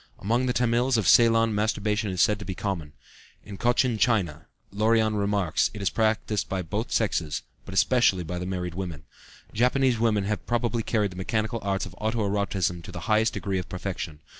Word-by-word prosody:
Among 120 Hz, +5 st, 0 dB
the -, -, +2 dB
Tamils 120 Hz, +1 st, +2 dB
of 110 Hz, -, 0 dB
Ceylon 115 Hz, -1 st, +5 dB
masturbation 105 Hz, 0 st, 0 dB
is 90 Hz, -2 st, +2 dB
said 105 Hz, -1 st, +2 dB
to -, -, -6 dB
be 95 Hz, -, -4 dB
common. 85 Hz, -8 st, -4 dB, 0.5 s
In 100 Hz, -, -8 dB
Cochin 120 Hz, +1 st, +1 dB
China, 90 Hz, -, +1 dB, 0.2 s
Lorion 110 Hz, +1 st, +2 dB
remarks, 100 Hz, -5 st, +1 dB
it 105 Hz, -, -6 dB
is -, -, +1 dB
practiced 110 Hz, -2 st, 0 dB
by 95 Hz, -1 st, -2 dB
both 105 Hz, +8 st, -4 dB
sexes, 85 Hz, -9 st, 0 dB, 0.2 s
but 95 Hz, -, -8 dB
especially 95 Hz, -5 st, +3 dB
by 90 Hz, +2 st, -4 dB
the 90 Hz, -, -4 dB
married 90 Hz, -2 st, -3 dB
women. 85 Hz, -5 st, -5 dB, 0.5 s
Japanese 125 Hz, +1 st, +2 dB
women 110 Hz, -3 st, +2 dB
have 105 Hz, +1 st, -2 dB
probably 120 Hz, -1 st, 0 dB
carried 105 Hz, -3 st, 0 dB
the -, -, -11 dB
mechanical 110 Hz, +4 st, -1 dB
arts 100 Hz, -1 st, -1 dB
of 95 Hz, -, -10 dB
auto 110 Hz, -1 st, -1 dB
erotism 95 Hz, -4 st, -1 dB
to -, -, -10 dB
the 85 Hz, -, -7 dB
highest 110 Hz, +4 st, +2 dB
degree 95 Hz, -2 st, -2 dB
of 90 Hz, -, -7 dB
perfection. 90 Hz, -5 st, -5 dB
105 Hz, 190 wpm, -26 LUFS, 95-115 Hz, 0.5 s, Ceylon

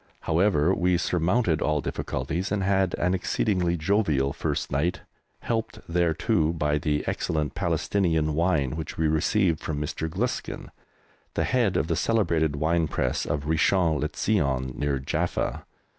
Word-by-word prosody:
However, 85 Hz, -1 st, +2 dB
we 90 Hz, -1 st, +2 dB
surmounted 90 Hz, +1 st, +1 dB
all 75 Hz, +2 st, +1 dB
difficulties, 75 Hz, +7 st, -3 dB
and 100 Hz, -1 st, 0 dB
had 95 Hz, -1 st, +2 dB
an 90 Hz, +1 st, 0 dB
exceedingly 90 Hz, -1 st, 0 dB
jovial 75 Hz, -6 st, +1 dB
first -, -, -2 dB
night, 85 Hz, +7 st, 0 dB, 0.4 s
helped 115 Hz, -1 st, -2 dB
thereto 85 Hz, -2 st, +1 dB
by 75 Hz, -2 st, 0 dB
the 75 Hz, 0 st, 0 dB
excellent 75 Hz, -2 st, -1 dB
Palestinian 85 Hz, -2 st, 0 dB
wine 80 Hz, -5 st, +1 dB
which 80 Hz, -1 st, -6 dB
we 80 Hz, -, +2 dB
received 80 Hz, +2 st, +2 dB
from 75 Hz, -3 st, -3 dB
Mr. 75 Hz, +2 st, -3 dB
Gluskin, 105 Hz, +10 st, -3 dB, 0.6 s
the -, -, +1 dB
head 115 Hz, -8 st, +1 dB
of 70 Hz, -, +1 dB
the -, -, -1 dB
celebrated 85 Hz, -9 st, +1 dB
wine 80 Hz, +2 st, +1 dB
press -, -, -1 dB
of 75 Hz, -1 st, -2 dB
Richon 80 Hz, 0 st, +2 dB
le 75 Hz, -, -1 dB
Zion, 70 Hz, -11 st, 0 dB
near 70 Hz, 0 st, 0 dB
Jaffa. 65 Hz, +2 st, -2 dB
80 Hz, 145 wpm, -26 LUFS, 75-95 Hz, 0.6 s, However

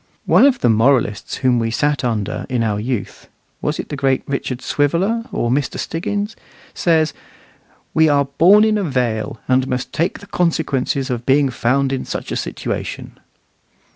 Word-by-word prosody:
One 275 Hz, -, +6 dB
of 270 Hz, -3 st, +1 dB
the -, -, +3 dB
moralists 115 Hz, -2 st, +2 dB
whom 125 Hz, -2 st, +4 dB
we 115 Hz, -1 st, 0 dB
sat 145 Hz, +5 st, 0 dB
under 110 Hz, -5 st, -2 dB
in 125 Hz, -3 st, 0 dB
our 105 Hz, -2 st, 0 dB
youth 115 Hz, -1 st, -4 dB, 0.3 s
was 150 Hz, -, -1 dB
it -, -, -6 dB
the 145 Hz, -, -4 dB
great 135 Hz, -2 st, +1 dB
Richard 135 Hz, -2 st, -3 dB
Swiveller, 180 Hz, -, 0 dB
or 120 Hz, -, -1 dB
Mr. 135 Hz, +1 st, -1 dB
Stiggins 205 Hz, +6 st, -3 dB, 0.4 s
says, 160 Hz, -3 st, +2 dB, 0.8 s
"We 160 Hz, 0 st, +4 dB
are 140 Hz, -1 st, +3 dB
born 175 Hz, +10 st, +5 dB
in 215 Hz, -1 st, +2 dB
a -, -, -1 dB
vale, 120 Hz, -, -1 dB
and 130 Hz, 0 st, +2 dB
must 125 Hz, -1 st, -3 dB
take 170 Hz, +4 st, 0 dB
the 200 Hz, -, -13 dB
consequences 140 Hz, -7 st, -1 dB
of 120 Hz, -1 st, -4 dB
being 140 Hz, +1 st, +4 dB
found 135 Hz, +3 st, +1 dB
in 130 Hz, -, -2 dB
such -, -, -5 dB
a -, -, -1 dB
situation." -, -, -5 dB
135 Hz, 170 wpm, -19 LUFS, 125-160 Hz, 0.8 s, One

